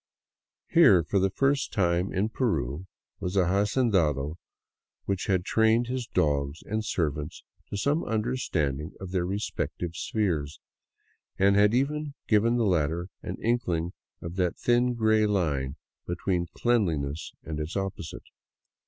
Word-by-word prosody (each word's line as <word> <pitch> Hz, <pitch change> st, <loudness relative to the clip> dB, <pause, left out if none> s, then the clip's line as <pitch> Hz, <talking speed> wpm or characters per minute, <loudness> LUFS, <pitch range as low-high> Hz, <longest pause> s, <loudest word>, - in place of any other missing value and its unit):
Here, 135 Hz, -, +7 dB
for 100 Hz, +5 st, +1 dB
the 95 Hz, +1 st, +2 dB
first 140 Hz, +6 st, +1 dB
time 90 Hz, -1 st, +1 dB
in 100 Hz, +4 st, 0 dB
Peru, 95 Hz, -, -1 dB, 0.3 s
was 90 Hz, +1 st, -3 dB
an 95 Hz, -2 st, +4 dB
hacendado 95 Hz, -, +1 dB, 0.7 s
who 100 Hz, -, +1 dB
had 95 Hz, -2 st, +1 dB
trained 110 Hz, +2 st, +3 dB
his 125 Hz, -2 st, -2 dB
dogs 70 Hz, -4 st, 0 dB
and 110 Hz, +1 st, -2 dB
servants 75 Hz, -7 st, -2 dB, 0.3 s
to -, -, -3 dB
some 145 Hz, +10 st, +1 dB
understanding 90 Hz, -, -1 dB
of 95 Hz, -2 st, -7 dB
their 90 Hz, -2 st, 0 dB
respective 95 Hz, -3 st, -3 dB
spheres, 85 Hz, -9 st, -1 dB, 0.8 s
and 100 Hz, +1 st, +4 dB
had 105 Hz, +2 st, +5 dB
even 145 Hz, +2 st, -1 dB
given 115 Hz, +2 st, +3 dB
the 115 Hz, -, +2 dB
latter 85 Hz, -1 st, 0 dB
an -, -, -5 dB
inkling 90 Hz, -8 st, 0 dB, 0.3 s
of 85 Hz, +2 st, -6 dB
that 90 Hz, -2 st, 0 dB
thin, 120 Hz, 0 st, +2 dB
gray 110 Hz, -1 st, +3 dB
line 75 Hz, -9 st, 0 dB, 0.3 s
between 85 Hz, 0 st, -1 dB
cleanliness 80 Hz, -11 st, 0 dB
and 80 Hz, -1 st, -5 dB
its 75 Hz, +6 st, -3 dB
opposite. 95 Hz, -5 st, -4 dB
95 Hz, 135 wpm, -27 LUFS, 80-110 Hz, 0.8 s, Here